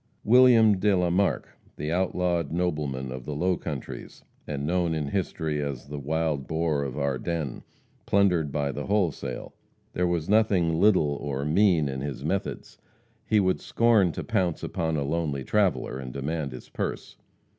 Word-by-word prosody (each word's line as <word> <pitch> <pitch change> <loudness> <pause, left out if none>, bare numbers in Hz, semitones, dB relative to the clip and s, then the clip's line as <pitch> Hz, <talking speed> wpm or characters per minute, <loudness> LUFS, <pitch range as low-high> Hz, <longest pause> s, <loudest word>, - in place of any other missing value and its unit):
William 115 -4 +6
de 100 0 +3
la 90 -1 +1
Marck, 95 +3 +1 0.3
the 75 +2 -3
outlawed 90 -3 0
nobleman 75 -7 -2
of 65 -1 -7
the 75 - -4
low 90 +4 +1
countries, - - -7 0.2
and 70 -1 -3
known 85 0 +1
in 75 -3 -2
history 80 -5 -2
as 70 -2 -5
"The 75 0 -5
Wild 75 -1 -1
Boar 80 -2 0
of 70 -2 -4
Ardennes," 70 +1 -2 0.5
plundered 90 -7 +3
by 70 0 -1
the 75 +1 -5
wholesale. 100 -7 -1 0.4
There 90 0 +1
was 85 -2 -1
nothing 95 -6 +3
little 85 -9 +3
or 70 -1 -3
mean 85 -1 +3
in 65 -1 -4
his 70 -2 -5
methods. - - -3 0.5
He 110 - +4
would 95 -2 +1
scorn 115 -6 +3
to - - -5
pounce 90 -4 -1
upon 80 -1 -1
a 70 - 0
lonely 75 -2 -2
traveller 95 -10 0
and 65 -2 -6
demand 70 +2 -3
his 65 - -9
purse. - - -5
80 Hz, 160 wpm, -26 LUFS, 70-90 Hz, 0.5 s, William